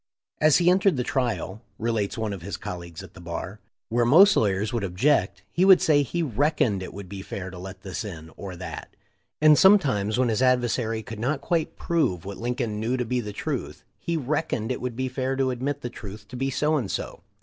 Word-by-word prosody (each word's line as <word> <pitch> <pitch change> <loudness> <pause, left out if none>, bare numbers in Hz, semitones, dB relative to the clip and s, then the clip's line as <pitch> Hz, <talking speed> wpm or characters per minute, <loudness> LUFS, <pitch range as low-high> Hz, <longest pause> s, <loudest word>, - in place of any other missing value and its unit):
"As 155 -1 +5
he 175 0 +4
entered 190 -3 +3
the 125 - 0
trial," 120 -5 -2 0.2
relates 110 -2 -1
one 110 -2 -2
of 95 - -7
his 90 0 -5
col 90 - -6
leagues 85 -2 -9
at - - -13
the - - -12
bar,* 85 +4 -6 0.3
"where 120 +1 +2
most 185 - +7
lawyers 105 +1 +1
would 115 -3 -1
ob 90 -2 -5
ject 100 -7 +2
he 180 - +1
would 190 -1 +8
say 145 -2 +4
he 170 +5 -2
'reckoned' 130 -6 +1
it 95 - -6
would 100 -1 -9
be 95 +1 -7
fair 95 -1 -6
to 90 - -9
let 95 +1 -9
this 95 +4 -4
in, 80 -6 -8
or 95 -2 -7
that; 85 - -8 0.5
and 155 -1 +7
sometimes, 130 - +4
when 125 -1 +2
his 110 +1 0
adver 125 -1 +3
sary 110 -2 -2
could 110 0 -8
not 135 +6 0
quite 160 +2 -1
prove 95 - 0
what 100 0 -7
Lincoln 120 -3 -2
knew 120 +4 0
to 125 - -1
be 125 +2 -1
the 105 -3 -5
truth, - - -4 0.2
he 170 -1 -2
'reckoned' 135 -5 -1
it 130 - -3
would 125 -2 -3
be 130 +2 -1
fair 130 +1 -2
to 135 -1 +1
admit 140 +3 -3
the - - -3
truth 105 -2 -9
to - - -9
be 135 +2 -1
so 150 +3 +1
and 115 -9 -2
so. - - -4
120 Hz, 230 wpm, -25 LUFS, 100-140 Hz, 0.5 s, would